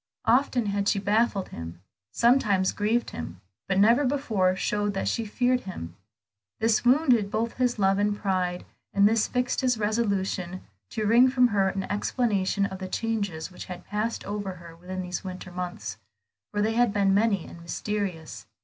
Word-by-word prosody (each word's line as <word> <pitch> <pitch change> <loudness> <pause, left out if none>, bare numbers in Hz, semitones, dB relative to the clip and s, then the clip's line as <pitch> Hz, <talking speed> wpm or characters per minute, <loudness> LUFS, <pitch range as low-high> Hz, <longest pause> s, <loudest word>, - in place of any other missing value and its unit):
Often 250 -1 +3
had 200 0 -1
she 205 - +1
baffled 205 0 +1
him, 85 +1 -8 0.3
sometimes 210 - +3
grieved 220 +3 0
him, 85 +2 -7 0.3
but 190 -1 0
never 230 +7 +5
before 225 -9 +1
showed 205 +1 -1
that 195 - -1
she 230 - -1
feared 250 +4 +1
him. 85 - -7 0.6
This 225 -1 +2
wounded 245 -5 +4
both 230 +3 -2
his 250 -2 +1
love 195 -1 +2
and 205 0 +1
pride, 185 -3 -1 0.3
and 200 0 +6
this 220 0 +2
fixed 250 +1 -1
his 250 -2 +2
resolution, 200 -4 -1 0.3
to 215 - -3
wring 235 +4 +6
from 250 -1 +4
her 195 -3 +2
an 195 0 -3
explanation 205 -1 0
of 190 -1 -5
the 190 - -5
changes 200 -6 -2
which 180 - -9
had 180 -1 -8
passed 215 +3 -2
over 205 -1 -4
her 170 -2 -12
within 185 +2 -6
those 180 -1 -4
winter 185 -1 -7
months, 175 - -5 0.5
for 205 0 0
they 220 +1 +1
had 240 -1 +3
been 200 -2 +2
many 200 -3 +2
and 170 - -11
mysterious. 180 -1 -4
205 Hz, 170 wpm, -26 LUFS, 185-230 Hz, 0.6 s, and